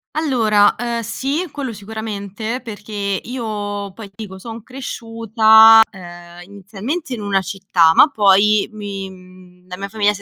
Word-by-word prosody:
Allora, 225 -9 +2
ehm, 235 0 -3
sì, 275 - -3
quello 275 -4 -5
sicuramente, 220 +2 -6
perché 215 -1 -10 0.3
io 205 -5 -5
poi 215 +1 -10
ti 195 +3 -10
dico, 190 -2 -10
son 225 +2 -9
cresciuta, 225 -3 +4
ehm, 175 -2 -12
inizialmente 210 - -6
in 230 - -5
una 200 -1 0
città, 190 -4 +2
ma 290 - +7
poi 205 -3 +3
mi, 200 -2 -6
mhmm, 185 -1 -17
la 180 0 -8
mia 200 +1 -5
famiglia 210 0 +1
si 200 - -10
210 Hz, 145 wpm, -18 LUFS, 195-225 Hz, 0.3 s, ma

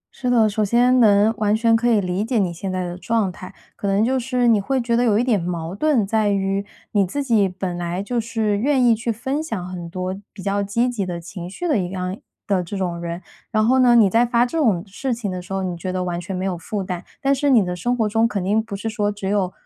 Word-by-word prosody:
是 250 - -2
的， 230 -3 +4
首 215 +1 0
先 245 +4 +3
能 210 0 +5
完 210 0 +2
全 230 0 +3
可 240 +1 +2
以 220 -3 +4
理 185 +1 -1
解 235 +1 -1
你 180 -4 +1
现 185 +3 -5
在 185 0 -2
的 175 0 -5
状 220 -4 0
态。 185 +1 -10 0.2
可 200 - -4
能 200 +3 +2
就 260 +1 +1
是 250 0 0
你 220 -3 +4
会 265 +6 0
觉 235 -1 0
得 240 - +3
有 215 -4 +3
一 235 - +2
点 230 -7 +1
矛 170 -1 -4
盾 255 -1 +2
在 215 0 +1
于 195 0 0 0.3
你 205 -2 +3
自 280 +10 -2
己 220 -7 +2
本 180 -1 -4
来 175 +2 -3
就 240 +3 -1
是 220 -2 -1
愿 265 0 +2
意 235 - +6
去 230 +2 -2
分 265 +7 -2
享 220 - -4
很 175 -2 -7
多 185 +2 -3 0.2
比 195 - -11
较 200 0 0
积 225 +5 0
极 235 -5 -2
的 175 -2 -4
情 175 +1 -8
绪 350 - -4
的 295 -10 +2
一 180 -2 -2
样 185 0 -3 0.3
的 190 -3 +1
这 195 +4 -6
种 175 -2 -2
人， 170 +1 -5 0.3
然 215 -1 +2
后 260 +2 +4
呢 245 -2 +5
你 225 -4 +6
在 225 +5 +3
发 240 0 +2
这 250 - -6
种 215 - +2
事 235 +5 -3
情 210 -5 -4
的 180 - -4
时 180 - -14
候 195 0 -1
你 180 -2 -3
觉 185 +2 -4
得 185 0 -2
完 175 -1 -3
全 190 +2 -5
没 185 +1 -2
有 190 -2 -1
负 195 +4 -4
担。 180 -1 -5 0.2
但 275 0 +2
是 285 +1 +1
你 225 -8 +5
的 180 - -3
生 240 +8 -1
活 220 -2 +1
中 225 +2 +2
肯 200 -5 -3
定 210 +4 +2
不 220 -3 -6
是 210 +3 -5
说 210 -2 0
只 200 -2 -5
有 195 -3 +1
205 Hz, 295 characters per minute, -21 LUFS, 185-235 Hz, 0.3 s, 意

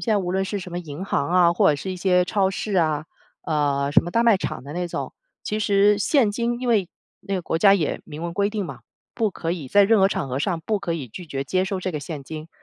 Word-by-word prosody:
在 - - +3
无 180 -2 -1
论 190 0 +1
是 200 +1 -3
什 180 -1 -8
么 175 - -2
银 165 +1 -7
行 140 -7 -1
啊， 175 -1 +4
或 - - +3
者 145 - 0
是 190 +6 -5
一 - - -6
些 180 0 +3
超 195 0 +1
市 200 +2 -4
啊， 155 -3 +1 0.4
呃， 145 -2 0
什 - - +6
么 175 - -6
大 230 +5 +2
卖 225 -4 +6
场 130 - -5
的 145 - -8
那 175 +1 -3
种。 - - -4 0.3
其 215 +1 -2
实 205 0 +4
现 230 0 +3
金， 235 +2 -1
因 250 - -4
为 210 -7 +2 0.3
那 195 0 -4
个 185 - -2
国 165 - -1
家 200 +1 +6
也 165 -6 -1
明 150 +3 -8
文 170 0 -3
规 200 +2 +1
定 210 -2 -3
嘛， - - -8 0.3
不 220 -3 0
可 165 -2 -4
以 155 -7 -6
在 200 +5 +5
任 220 +1 +4
何 195 - +5
场 140 - -2
合 130 0 -3
上 170 +3 -1
不 215 -2 0
可 170 - -2
以 145 -6 -5
拒 170 - -10
绝 135 -2 -4
接 185 +6 0
收 190 -1 -2
这 185 -1 -3
个 150 - -3
现 145 -1 -6
金， 155 +2 -8
180 Hz, 295 characters per minute, -23 LUFS, 155-200 Hz, 0.4 s, 什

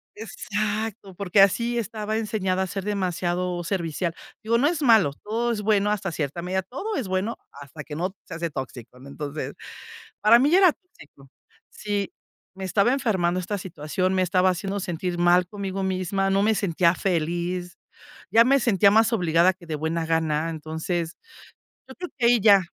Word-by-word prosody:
exacto. 215 -1 -4
Porque 195 +1 +3
así 235 +5 +3
estaba 215 -1 -3
enseñada, 195 -4 -1
a - - -3
ser 195 +1 -5
demasiado 180 -3 -1
servicial. 170 -2 -2 0.3
Digo, 230 +2 +2
no 270 +5 +3
es 320 -1 -1
malo, 220 - +5
todo 230 +3 -1
es 215 -3 -2
bueno 210 -1 +2
hasta 195 -3 -2
cierta 155 +1 -3
medida. 185 +2 -2
Todo 390 - -5
es 255 -8 -3
bueno 190 +5 -2
hasta 140 +2 -10
que 150 - -8
no 185 +5 -3
se - - -9
hace 170 0 -3
tóxico, 125 -3 -8
¿no? 135 - -13
Entonces, 145 +1 -5 0.7
para 225 +3 +7
mí, 275 +4 +3
ya 355 - +6
era 370 -5 +6
tóxico. 145 - -19 0.4
Sí, 205 -2 -3 0.4
me 190 0 -6
estaba 200 +6 +2
enfermando 190 -10 0
esta 195 +3 -3
situación, 185 0 -2
me 190 - +2
estaba 185 +1 +3
haciendo 195 +3 -3
sentir 175 -1 -3
mal 175 +1 +4
conmigo 195 -1 -4
misma. 190 +1 -1
No 195 +1 +3
me 220 +1 +3
sentía 175 -3 +2
feli, 175 0 -1 0.6
ya 230 +1 +6
me 275 +3 +4
sentía 200 -5 +4
más 225 +2 +4
obligada 175 -1 +3
que 180 -2 -17
de 160 - -4
buena 160 +2 -2
gana, 160 -1 0
entonces 160 +2 -4 0.7
yo 265 - -10
creo 360 0 -6
que 240 - +2
ahí 240 -1 +5
ya. 200 -2 +6
190 Hz, 175 wpm, -24 LUFS, 170-215 Hz, 0.7 s, para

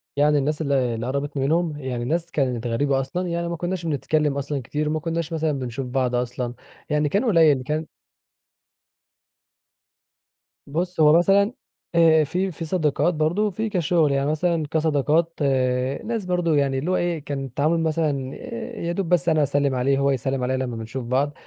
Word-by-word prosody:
يعني 145 +1 +3
الناس 150 +2 0
اللي 135 -5 +1
اللي 115 +2 -4
قربتني 140 +1 -2
منهم 160 0 +1
يعني 125 -3 -3
ناس 170 +5 -1
كانت 125 -4 -1
غريبة 135 +3 +1
أصلًا، 175 +7 -3
يعني 170 0 -2
ما 170 - -3
كناش 175 0 -3
بنتكلم 150 -1 0
أصلًا 140 0 -2
كتير 150 +5 -2
وما 155 0 0
كناش 165 +1 -3
مثلًا 160 -1 0
بنشوف 125 +1 -4
بعض 125 -1 0
أصلًا، 120 0 -2 0.4
يعني 150 -1 +1
كان 200 - +1
قليل 160 - +4
كان 155 +3 -2 2.8
بص 175 +4 -3
هو 155 +1 +7
مثلًا 200 +5 +3 0.4
آآ، 160 -2 +6
في 180 +6 -1
في 165 0 -6
صداقات 155 0 +1
برضه 160 +7 +1
وفي 215 +3 -3
كشغل. 170 -5 +2
يعني 140 +2 +1
مثلًا 165 0 0
كصداقات 160 +1 +1 0.7
ناس 225 -3 -2
برضه 175 -3 +1
يعني 135 -2 +1
اللي 170 +7 -2
هو - - +2
ايه، 175 -2 0
كان 135 -1 -3
التعامل 150 +6 0
مثلًا 150 -5 -1 0.5
يادوب 170 +1 -2
بس 175 -2 +3
أنا 155 -2 +3
أسلم 140 -1 +1
عليه 135 +2 +2
هو 140 0 +2
يسلم 130 0 -1
عليا 130 +1 0
لما 125 -2 -3
بنشوف 115 +3 -6
بعض. 135 +4 0
150 Hz, 170 wpm, -23 LUFS, 135-170 Hz, 2.8 s, هو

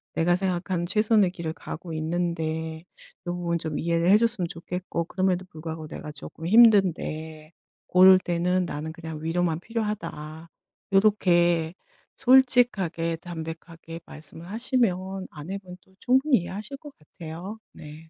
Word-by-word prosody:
"내가 175 +2 +3
생각한 180 -1 -1
최선의 215 -1 +3
길을 165 -3 -5
가고 165 +1 -8
있는데 160 -1 -2 0.4
요 175 - -1
부분 170 -1 -1
좀 155 -2 -4
이해를 170 +1 +1
해 205 - +8
줬으면 230 -6 0
좋겠고, 170 +1 -4
그럼에도 185 0 0
불구하고 160 0 -7
내가 150 - -7
조금 160 +2 -8
힘든데 170 -7 +3 0.3
고럴 185 +1 +7
때는 180 +1 0
나는 155 0 -5
그냥 160 -2 -7
위로만 165 0 0
필요하다." 180 -8 -5 0.4
요렇게 175 -5 +3 0.4
솔직하게 240 -11 +3
담백하게 165 0 -8
말씀을 160 +2 -10
하시면 195 -5 -1
아내분도 185 +3 -9
충분히 265 +2 +3
이해하실 205 +9 -6
것 295 +1 -12
같아요. 170 +7 -9
네. 150 0 -11
175 Hz, 305 characters per minute, -26 LUFS, 160-195 Hz, 0.4 s, 해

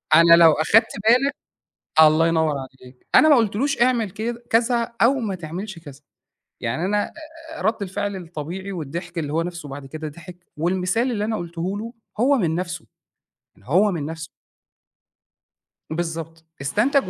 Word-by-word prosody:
أنا 170 +1 +7
لو 165 -1 +7
أخدت 215 +9 +3 0.2
بالَك 255 +4 +4 0.7
الله 155 +1 +6
ينوّر 160 -2 +1
عليك. 130 -1 -12
أنا 310 - +7
ما 290 - +7
قُلتلوش 235 +4 +1
اعمل 240 -5 +2
كد 230 +4 -4
كذا 235 +1 +1
أو 240 +4 +5
ما 220 -8 -2
تعملش 180 +3 -6
كذا، 145 -4 -12 0.6
يعني 120 +9 -2
أنا 205 +2 +1 0.5
آآ، - - -8
رد 220 -1 0
الفعل 200 +1 -3
الطبيعي 175 +3 -6
والضحك 170 +1 -6
اللي 150 -2 -3
هو 165 - +1
نفْسُه 170 -3 -6
بعد 135 0 -8
كده 155 +2 -6
ضحِك 170 +3 -13
والمثال 185 - 0
اللي 210 -3 -1
أنا 220 0 -1
قُلته 175 +3 -4
له 230 +2 -6 0.3
هو 275 +3 +4
من 165 -7 0
نفْسُه، 175 0 -4 0.7
يعني 100 - -21
هو 190 +8 +4
من 155 -5 -3
نفْسُه. 160 +1 -6 1.6
بالضبط 165 0 -5 0.2
استنتج 210 - +1
175 Hz, 155 wpm, -22 LUFS, 160-220 Hz, 1.6 s, أنا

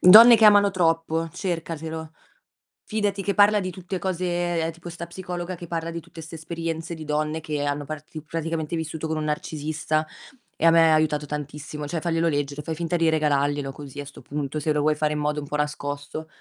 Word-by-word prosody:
"Donne 225 +6 +11
che 220 - +4
amano 205 -1 +7
troppo" 165 -2 +1
cercatelo. 160 -3 -4 0.7
Fidati 205 -2 -1
che 200 - 0
parla 205 +2 +6
di 185 -2 -2
tutte 185 +1 -5
cose 175 -2 -1
tipo 170 +1 -10
'sta 170 0 -7
psicologa 180 0 -5
che 175 0 -9
parla 165 0 -3
di 170 - -4
tutte 165 0 -12
'ste 160 +1 -9
esperienze 165 +1 -4
di 160 - -8
donne 155 +1 -1
che 150 -2 -2
hanno 145 0 -1
parti 155 +1 -7
praticamente 165 0 -3
vissuto 160 0 -4
con 160 0 -1
un 155 - -2
narcisista, 155 +1 -1 0.5
e - - 0
a 165 - +8
me 165 -1 +6
ha - - +6
aiutato 150 -1 +1
tantissimo, 150 +1 -5
cioè 165 +2 -2
farglielo 165 0 +1
leggere, 145 -1 -2
fai 160 +2 -4
finta 170 +2 -1
di 165 -1 +3
regalarglielo 145 -2 +1
così 140 0 -9
a 145 - -4
'sto 140 - -12
punto, 145 0 -3
se 155 +1 0
lo 150 -1 +2
vuoi 155 +1 +3
fare 150 0 0
in 150 - -2
modo 150 0 0
un 145 - -8
po' 150 - -2
nascosto. 150 +1 -3
160 Hz, 205 wpm, -25 LUFS, 150-170 Hz, 0.7 s, Donne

